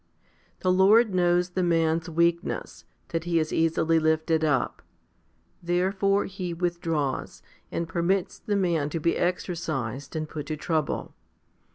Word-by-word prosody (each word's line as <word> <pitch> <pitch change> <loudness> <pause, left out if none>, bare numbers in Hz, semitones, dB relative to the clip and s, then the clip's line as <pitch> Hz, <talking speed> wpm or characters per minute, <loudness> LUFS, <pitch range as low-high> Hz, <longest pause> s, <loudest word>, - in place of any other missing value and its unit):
The 185 - +2
Lord 200 +4 +5
knows 175 0 +2
the 185 - -1
man's 165 -1 +1
weakness, 170 +1 -1 0.2
that 165 0 -2
he 170 -1 +1
is 155 -1 0
easily 165 0 +2
lifted 160 0 +1
up. 145 -4 0 0.8
Therefore 190 +3 +1
He 180 -3 -5
withdraws, 165 -5 -2 0.3
and 170 - -2
permits 175 +3 0
the 205 - -2
man 170 -7 +1
to 165 - -3
be 170 +2 +1
exercised 145 - -2
and 155 -1 -2
put 150 -2 -6
to 155 0 -3
trouble. 155 -1 -2
170 Hz, 135 wpm, -26 LUFS, 160-180 Hz, 0.8 s, Lord